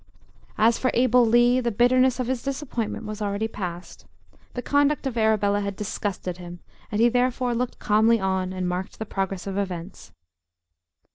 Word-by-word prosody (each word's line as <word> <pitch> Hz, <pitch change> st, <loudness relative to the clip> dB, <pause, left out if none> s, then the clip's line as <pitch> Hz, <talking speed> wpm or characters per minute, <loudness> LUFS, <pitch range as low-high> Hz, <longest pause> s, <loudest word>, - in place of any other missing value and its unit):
As 225 Hz, +2 st, +3 dB
for 255 Hz, -, +1 dB
Abel 250 Hz, 0 st, +4 dB
Lee, 240 Hz, +2 st, +4 dB
the 240 Hz, -2 st, 0 dB
bitterness 250 Hz, +3 st, +3 dB
of 255 Hz, -, 0 dB
his 255 Hz, 0 st, -2 dB
disappointment 270 Hz, -5 st, -4 dB
was 215 Hz, 0 st, -6 dB
already 205 Hz, +1 st, -1 dB
past. 180 Hz, -5 st, -7 dB, 0.5 s
The 245 Hz, -, -4 dB
conduct 285 Hz, 0 st, +2 dB
of 265 Hz, -3 st, -2 dB
Arabella 210 Hz, -2 st, +2 dB
had 200 Hz, -1 st, -3 dB
disgusted 190 Hz, -3 st, -4 dB
him, 175 Hz, -1 st, -9 dB, 0.3 s
and 210 Hz, -, -1 dB
he 235 Hz, -, +6 dB
therefore 250 Hz, 0 st, +1 dB
looked 245 Hz, +1 st, -2 dB
calmly 220 Hz, +2 st, +3 dB
on 190 Hz, -1 st, -1 dB
and 185 Hz, -1 st, -3 dB
marked 180 Hz, +2 st, -4 dB
the 220 Hz, -, -5 dB
progress 195 Hz, -2 st, -3 dB
of 195 Hz, 0 st, -3 dB
events. 180 Hz, -, -6 dB
220 Hz, 165 wpm, -24 LUFS, 195-245 Hz, 0.5 s, he